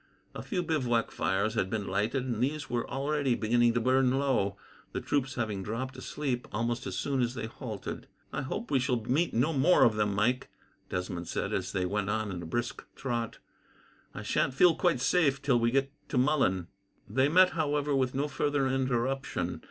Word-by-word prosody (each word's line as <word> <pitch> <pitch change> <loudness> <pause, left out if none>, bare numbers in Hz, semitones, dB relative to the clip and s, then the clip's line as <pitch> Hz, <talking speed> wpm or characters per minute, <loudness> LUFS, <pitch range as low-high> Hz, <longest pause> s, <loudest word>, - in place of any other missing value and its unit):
A - - -6
few 180 -5 -2
bivouac 125 -8 0
fires 100 +3 0
had 95 -4 0
been 105 -1 -2
lighted, 105 +7 0
and 120 -3 -2
these 145 +3 -2
were 120 -1 -1
already 140 -2 0
beginning 120 +1 +2
to - - +3
burn 130 +2 +3
low, 125 -8 +1 0.4
the - - -1
troops 135 -2 -1
having 110 -5 -2
dropped 115 +7 -4
asleep 130 -1 -3
almost 115 +2 -2
as - - -4
soon 135 -2 0
as 120 +1 0
they 115 -2 -3
halted. 110 -2 -6 0.3
"I - - -1
hope 205 - -4
we 135 - +4
shall 125 -1 +1
meet 150 +8 +1
no 135 +8 +1
more 155 +6 +5
of 115 - +5
them, 105 -1 +1
Mike," 120 +5 +1 0.4
Desmond 90 -1 -3
said, - - -2
as - - -1
they 95 - 0
went 100 +1 -1
on 110 -1 -1
at 90 -2 -5
a 85 - -7
brisk 120 +8 -3
trot. 120 -3 -3 0.8
"I - - -5
sha'n't 130 - 0
feel 175 +4 +6
quite 170 -8 +1
safe 140 -3 +3
till 135 -4 +2
we 115 0 +3
get 135 +2 +1 0.2
to 135 - -1
Mullen." 125 - +2 0.4
They 135 +2 +2
met, 185 +3 +6
however, 145 -3 0
with 130 -1 +1
no 140 +2 0
further 145 -2 0
interruption. 130 -7 -1
125 Hz, 190 wpm, -30 LUFS, 110-140 Hz, 0.8 s, feel